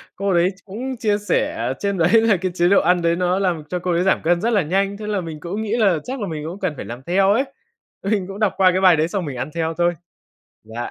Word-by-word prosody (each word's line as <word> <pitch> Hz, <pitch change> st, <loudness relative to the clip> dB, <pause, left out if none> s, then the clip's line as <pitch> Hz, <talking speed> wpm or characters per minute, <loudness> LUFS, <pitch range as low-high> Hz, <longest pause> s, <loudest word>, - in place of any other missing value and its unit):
cô 195 Hz, 0 st, -1 dB
đấy 175 Hz, +1 st, +3 dB
ch -, -, -55 dB
cũng 245 Hz, +6 st, -5 dB
chia 210 Hz, -3 st, +1 dB
sẻ 205 Hz, -9 st, -1 dB
trên 200 Hz, -1 st, -1 dB
đấy 170 Hz, +4 st, +2 dB
là 220 Hz, -4 st, +3 dB
cái 185 Hz, 0 st, -2 dB
chế 175 Hz, 0 st, +3 dB
độ 200 Hz, -, +5 dB
ăn 180 Hz, +1 st, +2 dB
đấy 170 Hz, 0 st, +2 dB
nó 180 Hz, +1 st, 0 dB
làm 175 Hz, -5 st, -1 dB
cho 180 Hz, -, -2 dB
cô 180 Hz, 0 st, -2 dB
ấy 170 Hz, +1 st, +1 dB
giảm 190 Hz, -, +2 dB
cân 170 Hz, +1 st, +2 dB
rất 230 Hz, -, +1 dB
là 205 Hz, -, +4 dB
nhanh. 195 Hz, +5 st, 0 dB
Thế 210 Hz, 0 st, -7 dB
là 205 Hz, -3 st, -1 dB
mình 160 Hz, -3 st, -7 dB
cũng 190 Hz, +7 st, -4 dB
nghĩ 220 Hz, +2 st, -1 dB
là 195 Hz, -7 st, +3 dB
chắc 260 Hz, +1 st, -5 dB
là 200 Hz, -, -2 dB
mình 155 Hz, -2 st, -5 dB
cũng 180 Hz, +5 st, -6 dB
cần 185 Hz, -5 st, -1 dB
phải -, -, -7 dB
làm 120 Hz, +3 st, -8 dB
theo 195 Hz, +4 st, +2 dB
ấy, 260 Hz, +5 st, +2 dB, 0.6 s
mình 195 Hz, -2 st, 0 dB
cũng 195 Hz, +2 st, -8 dB
đọc 210 Hz, -3 st, +2 dB
qua 185 Hz, -1 st, +5 dB
cái 185 Hz, +1 st, 0 dB
bài 180 Hz, -3 st, +6 dB
đấy 155 Hz, +2 st, +2 dB
xong 185 Hz, -1 st, -3 dB
mình 135 Hz, -4 st, -5 dB
ăn 130 Hz, +4 st, -3 dB
theo 165 Hz, 0 st, -1 dB
thôi. 175 Hz, 0 st, +2 dB, 0.7 s
Dạ, 115 Hz, +2 st, -6 dB
185 Hz, 285 wpm, -21 LUFS, 170-200 Hz, 0.7 s, bài